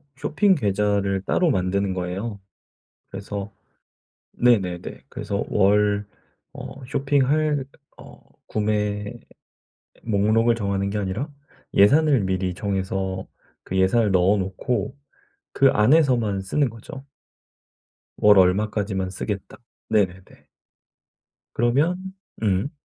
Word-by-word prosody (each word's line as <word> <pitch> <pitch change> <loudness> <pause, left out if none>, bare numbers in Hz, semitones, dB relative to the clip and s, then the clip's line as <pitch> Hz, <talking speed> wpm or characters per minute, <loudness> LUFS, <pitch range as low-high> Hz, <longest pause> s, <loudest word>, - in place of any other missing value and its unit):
쇼핑 190 +4 +2
계좌를 100 -4 0
따로 175 - +2
만드는 95 -2 0
거예요. 95 +4 -4 0.7
그래서 100 +1 -6 0.9
네네네 95 -8 +1
그래서 100 - -3
월 105 0 +2 0.5
어 135 - -9
쇼핑할 145 +2 +1 0.3
어 - - -14 0.3
구매 105 -1 -1 0.9
목록을 110 +2 +2
정하는 100 -3 -1
게 105 - -3
아니라 105 +8 -3 0.5
예산을 140 +6 +5
미리 95 -1 -1
정해서 95 -1 -3 0.4
그 95 - -4
예산을 100 +4 +3
넣어 95 +2 +3
놓고 95 +7 -2 0.6
그 135 - +5
안에서만 120 -5 +3
쓰는 130 +8 0
거죠. 115 +5 -11 1.1
월 105 -1 +6
얼마까지만 95 0 +1
쓰겠다. 100 +1 -5 0.3
네네네. 95 -4 -2 1.1
그러면 140 +9 +2 0.5
음. 100 +6 +1
105 Hz, 215 characters per minute, -23 LUFS, 95-120 Hz, 1.1 s, 월